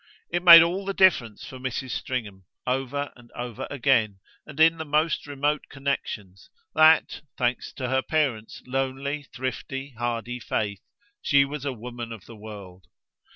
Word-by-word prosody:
It 175 +1 0
made 170 -2 +11
all 180 +4 -1
the 195 0 -3
difference 125 - +3
for 130 - -9
Mrs. 130 0 -4
Stringham, 105 -9 -4 0.2
over 135 +2 -2
and 120 -1 -18
over 120 -2 -6
again 115 -7 +1 0.3
and 150 0 -10
in 165 +1 +5
the - - -2
most 155 +1 0
remote 145 +1 -1
connexions, 110 -9 -4 0.2
that, 160 +1 +5 0.2
thanks 125 -1 -1
to 130 - -4
her 130 +1 +1
parent's 130 -8 -1
lonely 135 +2 -3
thrifty 135 +1 -5
hardy 120 0 -3
faith, 105 -4 -2 0.4
she 140 -1 +4
was 145 0 -6
a 140 - 0
woman 120 0 -7
of 110 -4 -9
the 115 - -12
world. 100 -4 -11
130 Hz, 155 wpm, -25 LUFS, 115-145 Hz, 0.4 s, made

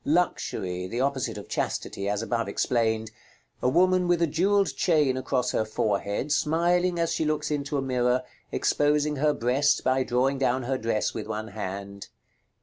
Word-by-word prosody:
_ - - -41
Luxury 95 - -1
(the 115 +6 -4
opposite 135 -1 -1
of - - -8
chastity, 100 0 -3
as 105 +2 -1
above 115 0 -1
explained). 110 -2 0 0.5
A 125 - +2
woman 185 +4 +3
with 175 -1 +3
a 170 - +4
jewelled 190 +6 +1
chain 150 -7 +2
across 130 0 -1
her - - +1
forehead, 105 +4 -1
smiling 175 +4 +2
as 165 -1 0
she - - 0
looks 150 0 -1
into 145 0 -1
a 135 - -1
mirror, 125 -1 +1 0.3
exposing 150 0 +1
her 150 +2 +3
breast 135 +4 +2
by 130 0 +2
drawing 130 +2 +1
down 130 -1 +1
her 130 +1 -1
dress 110 -1 -1
with 110 - -5
one 110 +1 -4
hand. 100 +1 -6
130 Hz, 170 wpm, -26 LUFS, 115-150 Hz, 0.5 s, a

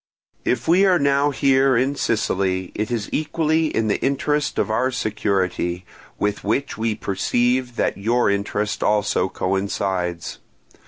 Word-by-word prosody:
If 120 -1 0
we 180 +4 +5
are 185 -2 +4
now 140 -1 +2
here 135 -2 +3
in 135 +4 +1
Sicily, 95 -6 -1
it 105 +1 -3
is 115 -4 -2
equally 160 +1 +1
in 115 -7 -1
the 105 - 0
interest 145 +2 0
of - - 0
our 125 +4 +1
security, 95 -6 -1 0.3
with 105 0 -1
which 135 +7 -1
we 110 0 -1
perceive 120 +5 0
that - - -1
your 120 +4 +2
interest 100 +1 -1
also 105 -3 +1
coincides. 95 -3 -2
110 Hz, 140 wpm, -22 LUFS, 100-135 Hz, 0.3 s, we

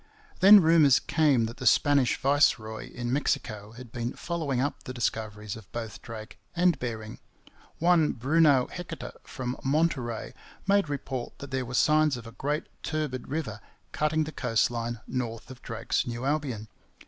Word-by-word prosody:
Then 200 +1 +9
rumours 155 -5 +6
came 145 -7 +2
that 115 +1 -6
the 130 - -2
Spanish 140 0 +4
viceroy 120 -6 +1
in 120 0 -3
Mexico 110 -7 -1
had 120 -1 -11
been 120 +1 -3
following 160 -7 -2
up 140 +3 -1
the 130 - -8
discoveries 105 -3 -3
of 110 -4 -13
both 115 -2 -6
Drake 110 -2 -9 0.2
and 175 -4 +3
Bering. 110 -3 -5 0.6
One 170 -2 +3
Bruno 140 +1 +4
Heceta 135 -8 -7
from 125 -1 -5
Monterey 135 -5 0 0.3
made 200 -4 +3
report 135 -3 -4
that 140 -1 -9
there 130 -1 -1
were 125 +1 -5
signs 155 -2 +4
of 120 - -10
a 115 - -9
great 145 +5 -2 0.2
turbid 150 -5 -3
river 130 -9 -4 0.3
cutting 155 +1 +1
the 155 - -5
coast 120 -5 +1
line 115 -1 -3
north 120 -1 -4
of 130 - -12
Drake's 115 +1 -2
New 120 +1 -4
Albion. 135 -7 -1
130 Hz, 160 wpm, -28 LUFS, 115-150 Hz, 0.6 s, Then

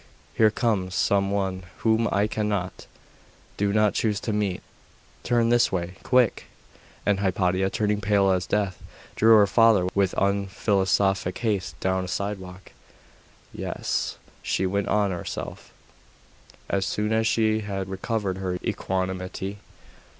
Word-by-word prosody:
here 110 - +5
comes 105 -5 -1
some 100 0 +2
one 95 -2 -1 0.2
whom 115 +1 +3
I 100 +1 +2
cannot 105 -4 -3 0.7
do 100 0 0
not 105 0 +3
choose 105 -3 0
to 110 - -2
meet. 100 -3 -1 0.6
Turn 120 -1 +2
this 120 0 +3
way 90 0 -3
quick!' 125 -3 +2 0.6
And 100 -1 +2
Hypatia, 95 -1 +1
turning 105 0 0
pale 100 -1 +3
as 90 -2 0
death, 100 -3 -1 0.3
drew 110 +1 +6
her 105 -2 +7
father 110 -2 +4
with 100 -2 +1
unphilosophic 95 -1 +1
haste 100 -6 -2
down 95 0 0
a - - -7
side 100 +2 -2
walk. 90 0 -12 0.8
'Yes,' - - -3 0.2
she 95 - -1
went 100 +1 -1
on 105 -2 +2
to 90 - -3
herself, - - -7 1.0
as 100 -1 0
soon 105 +3 -1
as 110 0 +2
she 110 -1 +2
had 100 -3 -4
recovered 95 0 -2
her 90 -1 -2
equanimity. 95 +1 -3
100 Hz, 135 wpm, -25 LUFS, 95-105 Hz, 1.0 s, her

